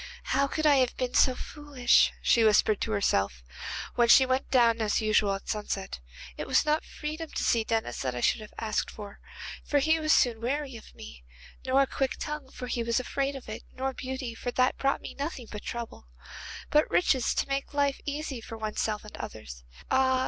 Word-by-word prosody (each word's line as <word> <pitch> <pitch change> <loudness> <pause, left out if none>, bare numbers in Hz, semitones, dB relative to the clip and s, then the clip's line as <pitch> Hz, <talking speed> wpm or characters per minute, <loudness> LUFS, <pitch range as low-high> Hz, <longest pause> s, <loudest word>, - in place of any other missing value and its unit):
'How 275 +1 +1
could 310 +3 -2
I 290 -2 +6
have 255 -2 +1
been 250 -1 -2
so 255 - +4
foolish,' 285 -5 +2
she 230 - +4
whispered 215 -1 +4
to 220 - -1
herself, 100 - 0 0.5
when 240 -1 +3
she 260 +3 +8
went 260 +1 -1
down 235 -3 +4
as 215 -1 +1
usual 215 -2 +2
at 195 - -9
sunset. 205 -3 -3 0.4
'It - - -5
was - - +3
not 305 +1 +1
freedom 310 +1 -6
to - - -3
see 230 -2 +2
Denis 225 0 -2
that 130 -2 -2
I - - -3
should 170 - +2
have 215 - -10
asked 215 -2 -1
for, 205 -2 -10 0.4
for 290 - +1
he 315 +3 +3
was 310 0 +1
soon 235 -6 +3
weary 270 +2 -2
of 225 - -13
me, 70 -4 -11 0.4
nor 265 +2 +4
a - - +1
quick 265 0 -2
tongue, 295 -3 -5
for 255 - -7
he 245 -1 -2
was 235 +1 +1
afraid 275 +2 -2
of 265 - -9
it, 215 - -6
nor 265 +1 -2
beauty, 260 -2 -5
for 245 - -5
that 255 +1 +2
brought 275 0 +1
me - - -7
nothing 280 -3 -5
but 210 - -6
trouble, 235 - -7 0.6
but 300 +1 +4
riches 265 -8 +2
which - - +1
make 275 0 -2
life 285 -1 +1
easy 290 -2 -4
both - - -12
for 225 - -7
oneself 215 -1 -2
and 210 - -10
others. - - -8 0.3
Ah! 260 0 +3
250 Hz, 205 wpm, -28 LUFS, 220-275 Hz, 0.6 s, she